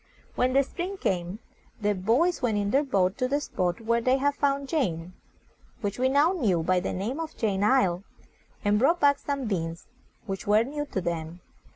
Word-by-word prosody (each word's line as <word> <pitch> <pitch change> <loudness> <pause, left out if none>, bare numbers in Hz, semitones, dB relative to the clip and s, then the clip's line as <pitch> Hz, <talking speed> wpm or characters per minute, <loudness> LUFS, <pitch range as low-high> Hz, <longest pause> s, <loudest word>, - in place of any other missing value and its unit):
When 255 +1 +1
the 275 +1 +5
spring 365 +7 -5
came, 180 - -2 0.4
the 210 -1 +1
boys 235 - +1
went 225 -5 +1
in 205 0 -1
our 275 - +5
boat 195 -9 0
to 255 - +1
the 285 +3 +1
spot 185 -7 -2
where 235 +1 +1
they 255 +3 +3
had 285 +1 +1
found 280 -1 0
Jane, 180 - -1 0.7
which 205 +2 -3
we 260 +1 +3
now 290 +5 +4
knew 205 - +1
by 185 +2 +2
the - - -3
name 225 - -3
of 325 -1 -6
"Jane's 200 -3 0
Isle," 195 -8 +2 0.6
and 205 0 +3
brought 330 +8 +3
back 285 -1 +4
some 280 -2 -3
beans, 165 -5 -3 0.4
which 195 -2 -5
were 210 +2 +5
new 290 +4 -4
to 190 - -3
them. 170 0 -4
230 Hz, 195 wpm, -27 LUFS, 185-280 Hz, 0.7 s, the